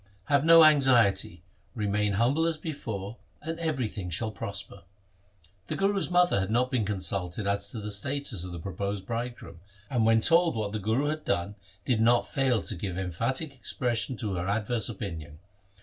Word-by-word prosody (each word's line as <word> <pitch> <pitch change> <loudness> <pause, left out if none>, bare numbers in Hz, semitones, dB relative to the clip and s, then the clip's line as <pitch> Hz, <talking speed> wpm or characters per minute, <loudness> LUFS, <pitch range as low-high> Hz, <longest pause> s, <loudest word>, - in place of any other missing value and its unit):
Have 140 -1 +3
no 165 0 +8
anxiety, 125 - +4 0.3
remain 105 -1 0
humble 130 +10 +2
as 165 -2 -1
before, 110 -9 -6 0.3
and 165 +2 -4
everything 125 - -2
shall 110 +6 -1
prosper.' 100 0 -5 0.9
The - - -3
Guru's 195 0 +1
mother 180 - +3
had 95 0 -2
not 125 +3 +1
been 120 -5 +1
consulted 95 -1 -3
as 100 0 -1
to 115 - -6
the 105 0 -5
status 120 -1 -2
of 90 - -6
the 85 - -6
proposed 100 +3 -4
bridegroom, 115 -5 -5 0.3
and 120 -4 +2
when 115 0 +4
told 170 +3 +4
what 105 -2 -2
the 110 - -3
Guru 115 +9 0
had 155 0 -3
done, 90 +4 -1 0.3
did 120 -4 +1
not 120 +1 +4
fail 130 -5 +1
to - - -5
give 90 +1 -4
emphatic 130 - -2
expression 125 -1 -2
to 105 -3 -3
her 90 0 -3
adverse 110 +4 0
opinion. 80 -8 -6
110 Hz, 170 wpm, -28 LUFS, 100-135 Hz, 0.9 s, no